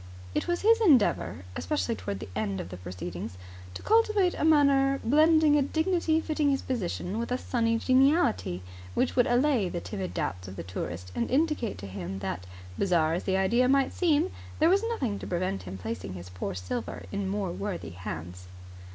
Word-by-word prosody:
It - - -1
was 345 0 0
his 455 +2 +5
endeavour, 255 - +3
especially 90 +2 -1
towards 95 0 -5
the - - -7
end 100 -3 -2
of 85 - -6
the 90 - -7
proceedings, 90 0 -6 0.4
to - - -7
cultivate 430 -4 +3
a - - -3
manner 280 -3 +4
blending 305 +3 +5
a - - +3
dignity 320 +2 +1
fitting 310 -2 0
his 275 -1 0
position 205 -4 -3
with 235 +1 -3
a 250 - +1
sunny 230 -3 0
geniality 255 - +2 0.3
which 255 - +1
would 245 - +4
allay 245 -5 +2
the 175 - -3
timid 190 -1 -5
doubts 90 +2 -3
of 95 - -8
the - - -6
tourist 90 0 -6
and 235 - -1
indicate 295 -4 0
to 100 - -8
him 95 -1 -5
that, 90 -2 -4 0.3
bizarre 165 -4 +2
as 175 - -2
the 190 0 +1
idea 235 +7 +3
might 275 0 +3
seem, 330 0 +2 0.3
there 315 +2 +4
was 390 +3 +4
nothing 255 - -2
to - - -7
prevent 175 - -1
him 95 +1 -7
placing 100 -1 -5
his 90 0 -8
poor 90 0 -4
silver 90 +6 -5
in 200 -1 -2
more 195 -2 -2
worthy 195 0 -4
hands. 90 0 -7
205 Hz, 185 wpm, -28 LUFS, -, 0.4 s, his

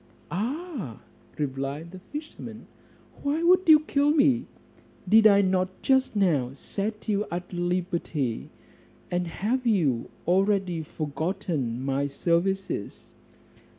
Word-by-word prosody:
"Ah!" 235 - -4 0.4
replied 140 +3 -3
the 185 - -9
fisherman, 295 - -8 0.6
"why 295 +4 0
would 365 0 +4
you 305 -1 +9
kill 290 -1 +1
me? 275 -5 +3 0.6
Did 220 +3 +7
I 200 -1 +6
not 185 0 0
just 265 -3 +2
now 150 -11 +2
set 210 - -4
you 210 -1 0
at 175 +1 -5
liberty, 175 -8 -2 0.6
and 175 0 0
have 240 +9 -1
you 150 - +2 0.2
already 190 -2 +2
forgotten 150 - -3
my 140 +1 0
services?" 170 - -1
185 Hz, 110 wpm, -26 LUFS, 155-225 Hz, 0.6 s, you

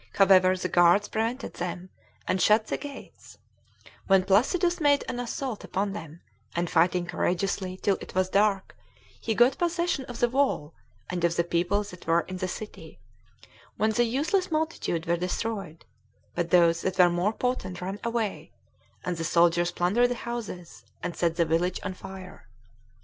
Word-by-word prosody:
However, 185 -1 +5
the 185 - -2
guards 175 +3 +4
prevented 230 +4 -2
them, 180 +1 -5 0.4
and 185 0 +1
shut 215 +1 +4
the - - -2
gates, 285 -2 -11 0.7
when 195 -1 +5
Placidus 335 - +2
made 285 -1 +4
an 245 - -4
assault 245 -1 -4
upon 195 +1 -2
them, 165 -4 -9 0.3
and 175 +1 0
fighting 175 +1 +3
courageously 185 +1 -1
till 200 -2 +2
it - - -10
was 185 0 +2
dark, 200 0 +1 0.4
he 225 - -2
got 245 +4 +4
possession 345 -5 0
of 245 -2 -8
the 240 - +4
wall, 245 - 0 0.4
and 175 -1 -3
of 170 0 +2
the 170 - +2
people 175 +4 0
that 180 -4 -12
were 165 +1 +4
in 185 +1 -7
the 185 - -2
city, 215 +4 -8 0.8
when 215 +1 +2
the 240 +2 +2
useless 315 - 0
multitude 310 - -2
were 170 +1 +1
destroyed; 180 -1 -4 0.5
but 175 -1 -2
those 170 -1 +4
that 185 -1 -2
were 180 -1 +7
more 175 +4 +1
potent 225 -8 -2
ran 190 +3 -5
away, 230 -3 -2 0.5
and 180 -1 -2
the 165 - -3
soldiers 170 +1 +3
plundered 200 +8 +2
the 245 - -1
houses, 220 -8 -6 0.2
and 180 -1 -3
set 170 -2 0
the 170 - +2
village 170 +3 0
on 185 - -3
fire. 185 0 -11
190 Hz, 165 wpm, -27 LUFS, 175-235 Hz, 0.8 s, were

